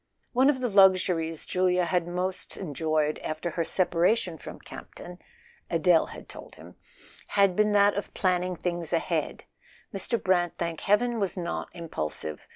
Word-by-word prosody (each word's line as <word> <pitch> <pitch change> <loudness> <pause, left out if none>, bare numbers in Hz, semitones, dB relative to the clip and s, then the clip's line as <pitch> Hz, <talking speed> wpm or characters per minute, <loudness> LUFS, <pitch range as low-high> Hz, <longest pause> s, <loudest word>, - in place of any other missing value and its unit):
One 260 +3 +4
of 265 -3 0
the 250 - +1
luxuries 185 -5 +3
Julia 180 -1 +1
had 170 0 0
most 180 +1 -4
enjoyed 155 -2 -1
after 160 +2 -4
her 165 - -1
separation 180 +2 +1
from - - -9
Campton 180 +1 -11 0.5
(Adele 165 0 +3
had - - -11
told - - -11
him) - - -13 0.5
had 200 -3 +3
been 210 +1 +3
that 205 0 +5
of 205 - -4
planning 180 -1 0
things 175 -1 -3
ahead: 165 - -1 0.5
Mr. 205 +4 -1
Brant, 175 -2 +1
thank 170 -2 -3
heaven, 230 +3 +2
was 195 -2 -1
not 175 -1 -4
impulsive. 80 - -5
180 Hz, 150 wpm, -27 LUFS, 165-195 Hz, 0.5 s, that